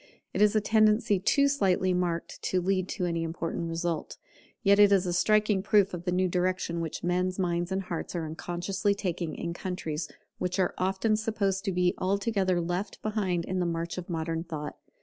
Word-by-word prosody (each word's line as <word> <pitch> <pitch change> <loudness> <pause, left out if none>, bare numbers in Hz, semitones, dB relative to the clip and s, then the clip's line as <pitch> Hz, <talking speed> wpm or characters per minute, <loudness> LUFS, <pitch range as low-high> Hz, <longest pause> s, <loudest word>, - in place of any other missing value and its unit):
It - - 0
is 210 0 +5
a 215 - +4
tendency 215 -1 +3
too 280 +9 +3
slightly 190 -9 +2
marked 175 -2 -2
to 185 - 0
lead 185 0 0
to 185 - -2
any 170 -1 -1
important 165 0 -3
result; 165 -1 -3 0.5
yet 200 0 +5
it 205 -1 +7
is 195 -2 +4
a 175 - -1
striking 210 +2 +3
proof 200 -1 +3
of 175 0 -5
the 180 - 0
new 185 +1 +2
direction 180 -1 -1
which 165 -2 -5
men's 180 +1 0
minds 175 -1 -1
and 190 +1 -1
hearts 175 -1 -5
are 165 -2 -2
unconsciously 175 +5 -2
taking 180 -4 -3
in 170 -1 -4
countries 165 -4 -4 0.3
which 180 0 -1
are 185 -2 +1
often 190 +4 +1
supposed 200 -3 -1
to 195 - +1
be 180 0 +2
altogether 195 -1 +1
left 175 +4 -3
behind 190 -6 -1
in 185 0 -2
the 175 - +1
march 170 +1 -3
of 175 - -9
modern 165 -1 -2
thought. 155 -4 -6
185 Hz, 190 wpm, -28 LUFS, 170-200 Hz, 0.5 s, it